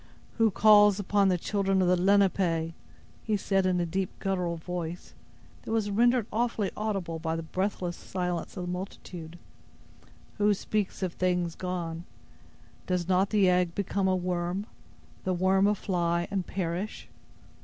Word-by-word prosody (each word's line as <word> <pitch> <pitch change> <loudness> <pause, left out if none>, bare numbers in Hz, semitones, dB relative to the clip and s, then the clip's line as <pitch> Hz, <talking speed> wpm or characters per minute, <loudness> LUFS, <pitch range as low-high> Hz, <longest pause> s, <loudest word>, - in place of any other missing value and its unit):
"Who 225 -1 +5
calls 210 0 +6
upon 200 0 +2
the 185 -1 +3
children 195 +1 0
of 185 - +3
the 180 - +4
Lenape?" 180 -3 +2 0.5
he 215 -2 0
said, 195 -1 +1
in 180 -1 +1
a 175 - +1
deep, 190 +3 -2
guttural 180 -3 -1
voice, 175 0 -6 0.5
that - - -10
was 220 -2 0
rendered 240 +2 +3
awfully 225 -3 0
audible 195 -6 -2
by 160 0 -2
the 165 - -4
breathless 185 0 -2
silence 180 -1 -4
of 180 - -3
the 180 - -3
multitude; 180 -2 -7 1.0
"who 205 0 +4
speaks 200 -1 -2
of 180 -2 -1
things 180 -2 0
gone? 175 -2 -4 0.8
Does 180 -2 0
not 190 +1 +3
the 205 -3 +3
egg 180 -1 +2
become 200 -1 0
a 185 - +3
worm—the 180 +1 -4
worm 190 +2 +3
a 210 - +3
fly, 175 -3 0
and 195 -3 -2
perish? 180 +2 -3
185 Hz, 150 wpm, -28 LUFS, 175-200 Hz, 1.0 s, calls